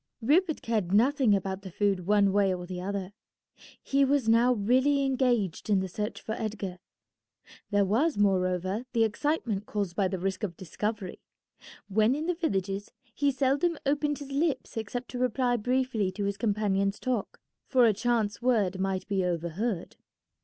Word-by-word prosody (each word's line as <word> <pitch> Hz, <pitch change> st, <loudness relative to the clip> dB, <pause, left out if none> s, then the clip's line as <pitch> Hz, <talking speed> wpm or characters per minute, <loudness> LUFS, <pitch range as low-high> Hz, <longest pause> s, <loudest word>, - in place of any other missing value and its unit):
Rupert 315 Hz, +7 st, +2 dB
cared 215 Hz, -6 st, -1 dB
nothing 250 Hz, -1 st, +4 dB
about 195 Hz, 0 st, -3 dB
the 190 Hz, -, -8 dB
food 190 Hz, -1 st, 0 dB
one 205 Hz, -1 st, +4 dB
way 200 Hz, -1 st, +3 dB
or 180 Hz, 0 st, -7 dB
the 180 Hz, 0 st, -6 dB
other. 195 Hz, 0 st, -4 dB, 0.7 s
He 275 Hz, 0 st, +2 dB
was 275 Hz, -3 st, +2 dB
now 230 Hz, +2 st, +5 dB
really 260 Hz, +6 st, +2 dB
engaged 245 Hz, -9 st, 0 dB
in 200 Hz, -2 st, +4 dB
the 190 Hz, -, -2 dB
search 210 Hz, +4 st, -4 dB
for -, -, -7 dB
Edgar. 205 Hz, -4 st, -4 dB, 0.9 s
There 205 Hz, -1 st, +3 dB
was, 245 Hz, -, +1 dB
moreover, 190 Hz, +2 st, +1 dB
the 230 Hz, -2 st, +3 dB
excitement 225 Hz, -3 st, -1 dB
caused 200 Hz, -4 st, -3 dB
by 195 Hz, -2 st, +2 dB
the 190 Hz, +1 st, -3 dB
risk 190 Hz, +1 st, -2 dB
of 185 Hz, -6 st, -4 dB
discovery. 205 Hz, +2 st, -4 dB, 0.7 s
When 215 Hz, +5 st, +3 dB
in 305 Hz, +2 st, -3 dB
the 355 Hz, -, +1 dB
villages 200 Hz, -, -2 dB, 0.2 s
he 285 Hz, +2 st, +1 dB
seldom 280 Hz, +5 st, +1 dB
opened 290 Hz, +1 st, +1 dB
his 285 Hz, -1 st, -9 dB
lips 295 Hz, +2 st, -1 dB
except 230 Hz, +3 st, -4 dB
to 250 Hz, -, -5 dB
reply 250 Hz, 0 st, +1 dB
briefly 245 Hz, -4 st, 0 dB
to 205 Hz, +2 st, -3 dB
his 200 Hz, 0 st, -1 dB
companion's 200 Hz, -2 st, 0 dB
talk, 250 Hz, -6 st, -2 dB, 0.3 s
for 255 Hz, -3 st, +4 dB
a 220 Hz, -, +4 dB
chance 220 Hz, 0 st, 0 dB
word 210 Hz, -7 st, +1 dB
might 190 Hz, -1 st, -2 dB
be 195 Hz, -2 st, 0 dB
overheard. 175 Hz, +3 st, -2 dB
215 Hz, 165 wpm, -28 LUFS, 195-255 Hz, 0.9 s, now